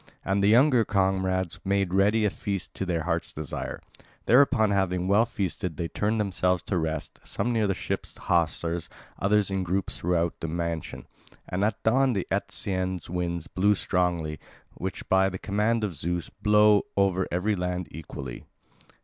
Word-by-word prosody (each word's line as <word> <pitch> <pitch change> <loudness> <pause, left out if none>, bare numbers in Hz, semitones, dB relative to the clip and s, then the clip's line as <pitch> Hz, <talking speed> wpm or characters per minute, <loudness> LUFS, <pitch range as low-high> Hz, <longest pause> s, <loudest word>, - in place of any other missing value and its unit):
And 100 +1 +1
the - - +5
younger 125 +2 +5
comrades 95 -3 0
made 100 -2 0
ready 105 +3 +3
a 105 - +2
feast 100 0 -4
to 95 - -4
their 85 -3 0
hearts' 85 0 -1
desire. 75 -2 -5 0.5
Thereupon 125 -4 +5
having 90 -2 0
well 105 +4 +4
feasted 95 -6 -3
they 85 0 -2
turned 110 +2 0
themselves 90 -3 +1
to 95 - -1
rest, 80 -2 -4
some 120 - -2
near 110 -2 +2
the 95 - 0
ship's - - -4
hawsers, 85 0 0 0.3
others 100 0 +2
in 95 0 0
groups 95 +2 -2
throughout 85 -1 +1
the 80 - -3
mansion. 85 -1 -4 0.4
And 90 +2 -1
at 105 0 -1
dawn 130 +3 +3
the 100 -4 -1
Etesian 95 -2 -1
winds 85 -1 -2
blew 100 +4 +2
strongly, 85 -5 -1 0.3
which 95 +1 -5
by 95 0 +4
the 95 - -5
command 105 +4 0
of 100 -4 -1
Zeus 85 +3 -3
blow 105 0 +4 0.2
over 95 -2 +2
every 100 +5 +1
land 90 -1 -2
equally. 70 -5 -8
95 Hz, 160 wpm, -27 LUFS, 85-105 Hz, 0.5 s, the